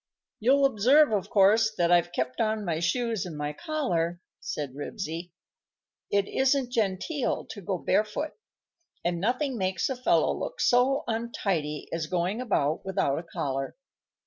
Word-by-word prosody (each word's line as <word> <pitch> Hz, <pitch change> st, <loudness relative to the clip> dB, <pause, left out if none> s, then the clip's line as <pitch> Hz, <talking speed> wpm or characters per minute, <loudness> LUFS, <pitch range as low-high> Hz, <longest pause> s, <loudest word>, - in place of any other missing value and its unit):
"You'll 275 Hz, +5 st, +4 dB
observe, 270 Hz, +4 st, +5 dB
of 205 Hz, -3 st, -1 dB
course, 215 Hz, +3 st, +5 dB
that 175 Hz, -1 st, +2 dB
I've 175 Hz, 0 st, +4 dB
kept 130 Hz, -5 st, -2 dB
on 215 Hz, -1 st, 0 dB
my 165 Hz, -3 st, -1 dB
shoes 225 Hz, +4 st, 0 dB
and 170 Hz, -4 st, -7 dB
my 150 Hz, 0 st, -3 dB
collar," 175 Hz, -, -1 dB, 0.2 s
said 145 Hz, -4 st, -4 dB
Ribsy. 165 Hz, +3 st, -5 dB, 0.8 s
"It 200 Hz, 0 st, +2 dB
isn't 265 Hz, -1 st, +1 dB
genteel 230 Hz, -, -1 dB
to 205 Hz, -, -8 dB
go 190 Hz, 0 st, -2 dB
barefoot, 215 Hz, -, 0 dB, 0.7 s
and 175 Hz, 0 st, 0 dB
nothing 255 Hz, +3 st, 0 dB
makes 185 Hz, +3 st, 0 dB
a 265 Hz, -, -1 dB
fellow 250 Hz, +1 st, +2 dB
look -, -, -5 dB
so 255 Hz, +3 st, +3 dB
untidy 195 Hz, -10 st, -2 dB
as 165 Hz, -2 st, -2 dB
going 180 Hz, +7 st, -1 dB
about 160 Hz, -, 0 dB
without 170 Hz, -7 st, 0 dB
a -, -, -7 dB
collar. 135 Hz, -1 st, -3 dB
200 Hz, 145 wpm, -27 LUFS, 170-245 Hz, 0.8 s, observe